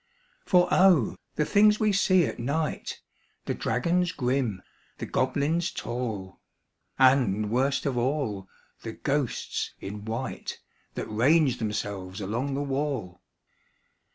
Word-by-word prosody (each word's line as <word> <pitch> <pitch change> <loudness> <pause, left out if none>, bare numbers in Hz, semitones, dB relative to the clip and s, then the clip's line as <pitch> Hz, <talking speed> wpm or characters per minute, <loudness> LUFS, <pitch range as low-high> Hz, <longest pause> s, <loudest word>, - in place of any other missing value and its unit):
For 180 -2 +5
O! 180 - +5 0.2
the 150 - +1
things 210 +3 +4
we 215 -1 +3
see 185 -3 +4
at - - -5
night 150 +6 -2 0.5
The - - -1
dragons 175 +9 0
grim, 125 - -1 0.3
the - - -4
goblins 145 +7 0
tall, 110 -6 -5 0.6
And, 120 -6 +3
worst 135 +3 +1
of 130 -4 0
all, 120 -7 -1 0.3
the 115 - -6
ghosts 140 -1 -2
in 105 +1 -7
white 115 +4 -4 0.4
That - - -3
range 130 +4 +3
themselves 100 -3 -4
along 120 +8 -2
the 140 - -1
wall! 135 -10 -3
130 Hz, 120 wpm, -27 LUFS, 110-150 Hz, 0.6 s, For